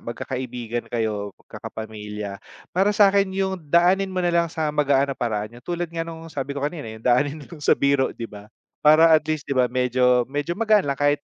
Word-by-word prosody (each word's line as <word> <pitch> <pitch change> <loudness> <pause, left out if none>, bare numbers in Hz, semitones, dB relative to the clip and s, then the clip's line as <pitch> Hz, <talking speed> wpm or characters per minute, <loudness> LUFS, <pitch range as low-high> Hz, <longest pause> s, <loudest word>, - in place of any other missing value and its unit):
magkakaibigan 120 -1 -5
kayo, 105 -4 -3
magkakapamilya. 105 -2 -7 0.3
Para 195 +3 +2
sa'kin 200 -1 +5
yung 190 -1 -1
daanin 180 +5 +3
mo 185 -1 -2
nalang 170 -1 +2
sa 155 -2 -2
magaan 140 -2 +2
na - - -12
paraan, 105 -2 -2
yung - - -42
tulad 175 -1 -3
nga 165 - -3
ng 165 -1 -7
sabi 140 0 -4
ko 140 - -2
kanina 145 -5 -4
yung 110 0 -10
daanin 140 +4 +2
niyo 155 +1 -12
sa - - +3
biro 140 -1 +2
di 115 - -5
ba, 105 -2 -11 0.3
para 160 +2 +6
at 155 - +6
least 155 -2 -1
di 140 - -3
ba, 125 -2 +2
medyo 125 0 +2
medyo 145 +4 -2
magaan 215 -7 +3
lang 140 - 0
kahit 145 +1 +2
140 Hz, 195 wpm, -23 LUFS, 120-170 Hz, 0.3 s, para